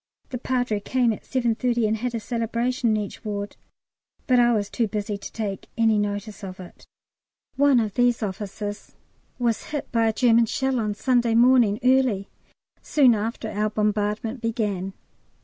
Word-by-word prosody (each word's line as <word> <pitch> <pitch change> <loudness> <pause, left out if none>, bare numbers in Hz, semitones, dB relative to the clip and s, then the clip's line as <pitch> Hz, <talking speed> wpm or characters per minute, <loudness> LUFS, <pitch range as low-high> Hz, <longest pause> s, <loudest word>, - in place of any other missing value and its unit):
The 250 - -4
Padre 245 -4 -1
came 240 +2 +1
at - - -8
7.30 240 -2 0
and 220 +1 0
had 240 +2 -3
a - - -1
Celebration 235 +2 -1
in 215 - +2
each 205 -2 -5
ward, 205 -1 -4 0.7
but 250 -2 +4
I 240 0 +5
was 210 -3 0
too 230 +2 -1
busy 210 0 -3
to 200 - -8
take 205 -3 -4
any 225 -2 +3
notice 205 0 -4
of 185 -1 -7
it. 180 -2 -12 0.7
One 280 -2 +4
of 215 -3 -1
these 245 0 +2
officers 205 +1 -5 0.4
was 235 -3 0
hit 295 -2 -5
by 230 -1 +2
a - - +3
German 230 -1 +4
shell 265 +2 0
on 210 -2 -1
Sunday 240 0 +2
morning 240 -3 +5
early, 255 -6 +2 0.5
soon 270 -5 +4
after 220 +1 -3
our 210 +1 0
bombardment 210 +2 -1
began. 205 -5 -2
225 Hz, 165 wpm, -24 LUFS, 210-245 Hz, 0.7 s, I